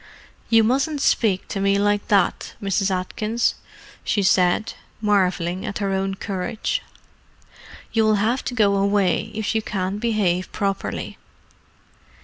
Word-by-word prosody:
"You 225 -1 +5
mustn't 275 +6 +1
speak 210 -8 +1
to 195 - -3
me 195 0 +2
like 205 0 +1
that, 200 -3 +1
Mrs. 195 0 0
Atkins," 210 +5 -1 0.5
she 205 - 0
said, 185 +2 +2 0.3
marvelling 190 -3 +1
at 210 -3 -4
her 200 -2 -1
own 195 0 -1
courage. 200 - -3 1.1
"You 225 -1 +3
will 215 0 +4
have 225 +6 0
to 245 - -3
go 200 -4 +3
away 200 0 +1
if 220 0 -1
you 220 - +1
can't 195 -1 -3
behave 205 -6 0
properly." 195 -2 -3
200 Hz, 130 wpm, -22 LUFS, 190-220 Hz, 1.1 s, You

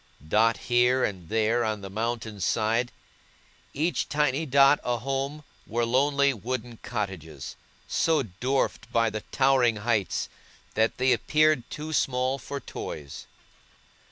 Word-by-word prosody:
Dotted 110 +6 +2
here 125 +1 +3
and 90 -5 -3
there 115 +2 +2
on 110 -2 -2
the 100 - -7
mountain's 110 -2 -3
side, 115 +6 +1 0.8
each 160 +5 -1
tiny 150 +1 +1
dot 140 +2 +6
a 120 -1 0
home, 135 +4 -3 0.2
were 120 +1 0
lonely 140 +3 +3
wooden 120 +1 -5
cottages, 90 - -5 0.3
so 160 -4 +2
dwarfed 125 +7 -2
by 115 -1 +2
the 110 0 -4
towering 130 -4 +3
heights 105 -2 0 0.5
that 110 +1 +1
they 130 +1 +3
appeared 155 -5 +2
too 155 +1 -6
small 130 -1 +1
for 140 +3 -5
toys. 75 - -7
120 Hz, 130 wpm, -27 LUFS, 110-135 Hz, 0.8 s, dot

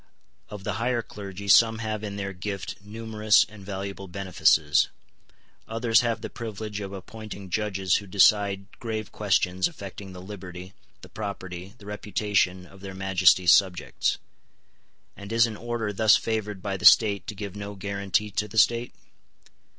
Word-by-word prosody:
Of 105 -2 -8
the - - -2
higher 120 -1 0
clergy 100 -1 -8
some 115 +2 +6
have 110 -1 -4
in 100 -1 -5
their 100 -1 -4
gift 95 +1 -5
numerous 110 0 +2
and 105 -2 -13
valuable 95 0 -6
benefices; 90 -5 +2 0.8
others 115 +1 +3
have 120 -2 -1
the - - -4
privilege 110 -2 -6
of 100 -2 -6
appointing 100 0 -9
judges 95 -3 +1
who 100 - -7
decide 100 0 +3
grave 110 -3 -4
questions 95 -3 +1
affecting 100 - -9
the 90 - -10
liberty, 90 -1 -9 0.3
the - - -12
property, 95 -2 -7
the 105 - -15
reputation 105 -3 -1
of 95 +1 -16
their 95 -1 -8
Majesties' 95 -2 +4
subjects. 95 -3 +1 1.0
And 100 +1 -10
is 115 0 +5
an 115 -2 -5
order 115 -1 -3
thus 110 +1 +5
favoured 105 -4 -2
by 100 -2 -2
the 100 - -11
state 100 -4 +6
to 110 - -5
give 100 -1 -6
no 100 0 -6
guarantee 100 +1 -1
to 105 +1 -1
the 110 +2 -9
state? 120 +2 +3
100 Hz, 155 wpm, -26 LUFS, 95-110 Hz, 1.0 s, some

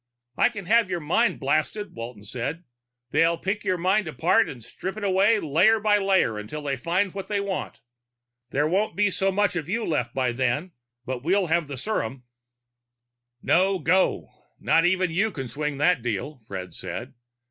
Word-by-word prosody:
"I - - +4
can 205 -6 -8
have 225 +1 +3
you 175 -1 -1
mind 175 +10 +1
blasted," 155 +9 -1
Walton 115 -2 -8
said. 125 - -4 0.5
"They'll 165 +1 +3
pick 190 +5 -3
your 185 - 0
mind 190 +3 +1
apart 175 - +2
and 120 -4 -9
strip 190 - -6
it 215 - -6
away 200 +3 +3
layer 185 +9 +3
by 210 -1 +3
layer 190 - +2
until 130 +9 -7
they 140 -1 -1
find 175 +8 0
what 195 -1 -6
they 205 -1 0
want. 195 -7 -4 0.7
There 145 +3 +1
won't 195 +6 0
be 205 -1 +2 0.2
much 200 -1 +1
of 160 -2 -3
you 230 +3 -1
left 125 -7 -1
by 130 -2 +1
then, 130 +8 -1 0.3
but 130 -1 -4
we'll 185 +3 +2
have 170 -3 +1
the 140 -2 -6
serum." 130 - -3 1.2
"No 190 +2 +3
go. 180 +3 +1 0.3
Not 165 +1 +3
even 185 -1 +2
you 200 +7 +1
can 135 -10 -6
swing 150 +3 -3
that 150 -1 +3
deal," 120 +5 -3
Fred 95 -2 -6
said. - - -6
175 Hz, 175 wpm, -25 LUFS, 135-195 Hz, 1.2 s, I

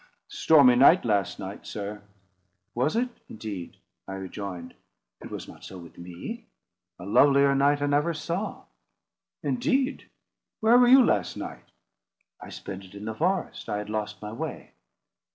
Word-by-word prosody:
Stormy 140 -6 +5
night, 140 +7 +6
last 100 -5 0
night, 95 +1 -7
sir." 105 0 -6 0.7
"Was 130 - 0
it, 245 +2 +1 0.2
indeed?" 105 -5 -7 0.3
I 95 - -6
rejoined. 95 -2 -7 0.5
"It - - -9
was - - -7
not - - -13
so 95 - -9
with 85 -2 -13
me. 85 0 -8 0.5
A 90 - -10
lovelier 140 +6 +5
night 145 +1 +2
I - - +2
never 145 +3 +2
saw." 170 +7 -4 0.8
"Indeed! 260 +2 0 0.5
Where 230 +3 +5
were 245 - +6
you 260 0 +8
last 100 -4 0
night?" - - -8 0.7
"I - - -9
spent 95 0 -8
it 95 +1 -15
in 100 +1 -8
the 110 - -3
forest. 180 - -2
I 105 - -1
had 105 0 -5
lost 110 0 -4
my 105 - -5
way." - - -6
115 Hz, 150 wpm, -26 LUFS, 100-160 Hz, 0.8 s, you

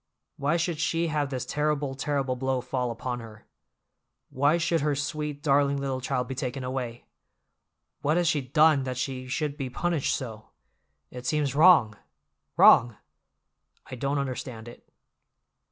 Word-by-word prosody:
Why 145 +4 +1
should 165 -2 -2
she 165 +1 0
have 150 -3 -1
this 130 -2 -4
terrible, 150 -2 -1
terrible 135 -1 -1
blow 130 0 -1
fall 125 0 -2
upon 120 +1 -4
her? 110 -2 -12 0.9
Why 145 +5 +2
should 170 -1 0
her 145 0 +1
sweet, 145 0 -4
darling 140 -1 +3
little 135 -2 -3
child 125 -1 -2
be 130 - -4
taken 130 0 -4
away? 125 -2 -4 1.0
What 150 +3 +1
has 175 -1 +2
she 155 -3 +2
done 150 +2 +4
that 130 -1 -4
she 130 0 -4
should 145 +2 -2
be 135 -3 -4
punished 165 +3 -1
so? 110 -5 -7 0.6
It 125 0 -7
seems 150 -3 0
wrong—wrong! 120 - +4 0.9
I - - -4
don't 140 +3 -1
understand 130 -4 -4
it." 120 - -13
135 Hz, 145 wpm, -27 LUFS, 125-150 Hz, 1.0 s, done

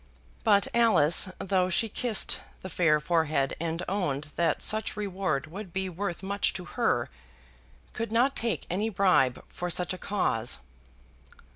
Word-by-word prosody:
But 205 -3 +4
Alice, 210 -7 +5
though 185 -1 +1
she 225 +5 +1
kissed 225 0 -1 0.2
the 185 - -5
fair 155 -4 +3
forehead 155 -3 +1
and 165 +1 -2
owned 155 -7 -2
that 170 - +1
such 215 0 0
reward 190 -8 -2
would 185 +4 -8
be 190 +1 -2
worth 185 0 -4
much 200 +1 0
to 180 - -6
her, 175 - 0 0.9
could 230 0 -4
not 245 +4 +3
take 230 -1 -1
any 205 +5 -1
bribe 180 - +2
for 180 - -5
such 180 +2 0
a 185 - -7
cause. 125 - 0
185 Hz, 145 wpm, -28 LUFS, 160-205 Hz, 0.9 s, Alice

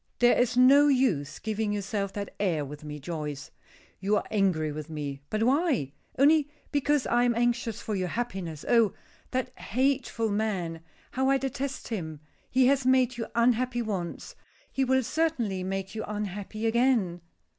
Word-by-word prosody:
"There 245 0 +5
is 245 0 +1
no 275 +3 +7
use 200 - +1
giving 215 0 -2
yourself 200 -1 -2
that 200 -1 -5
air 170 -7 0
with 145 +2 -9
me, 150 0 -6
Joyce. 150 -2 -5 0.5
You 200 +2 +1
are - - 0
angry 185 -7 +1
with 155 +1 -6
me; 145 -3 -5
but 215 +1 0
why? 260 - +1 0.2
Only 295 +1 +5 0.2
because 290 -1 +1
I 240 +1 +2
am 240 -1 +2
anxious 235 -1 0
for 215 - -2
your 185 -1 -1
happiness. 185 -9 -4
Oh! 230 -4 +4 0.4
that 255 0 -2
hateful 250 -2 0
man, 190 -6 -2 0.3
how 265 0 +1
I 275 - +4
detest 270 0 -4
him! 160 -9 -4 0.3
He 260 0 +4
has 270 +1 +3
made 255 -1 +3
you 230 - -3
unhappy 240 +1 +2
once 190 -6 -4 0.4
he 270 - 0
will 260 0 +2
certainly 240 - -1
make 190 +1 -3
you 220 - -4
unhappy 210 +1 -4
again." 225 -7 +2
220 Hz, 160 wpm, -28 LUFS, 185-255 Hz, 0.5 s, no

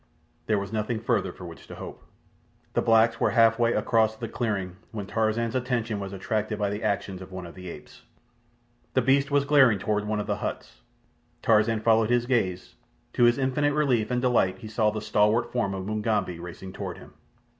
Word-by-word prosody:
There 110 - +2
was 100 +2 -4
nothing 110 +1 -1
further 110 -2 0
for 90 - -11
which 85 -1 -11
to - - -9
hope. - - -9 0.7
The - - +2
blacks 115 0 +4
were - - +3
half 115 -1 +4
way 120 0 +3
across 110 -2 +2
the 115 +1 -5
clearing 100 -6 -3
when 105 -3 -5
Tarzan's 110 +2 0
attention 120 -4 -1
was 100 -1 -5
attracted 105 +2 -2
by 100 -1 -1
the 105 +1 -4
actions 95 -2 -2
of 95 - -10
one 95 -1 -6
of 85 - -10
the 90 -1 -9
apes. - - -12 0.9
The 130 - +3
beast 140 +3 +3
was 140 -1 +2
glaring 135 -7 +5
toward 105 +1 -1
one 105 0 -1
of 105 - -2
the - - -1
huts. - - -6 0.6
Tarzan 110 0 +3
followed 110 0 +3
his 120 0 +2
gaze. 95 -8 -1 0.4
To 120 - +4
his 120 +2 +4
infinite 145 +2 +1
relief 130 -8 +1
and 125 0 -1
delight 115 -7 +2
he 110 - -9
saw 110 0 +1
the 105 0 -4
stalwart 105 +2 +2
form 110 -6 -1
of 95 -1 -5
Mugambi 105 -4 -1
racing 90 +2 -9
toward - - -6
him. - - -14
110 Hz, 200 wpm, -26 LUFS, 100-120 Hz, 0.9 s, glaring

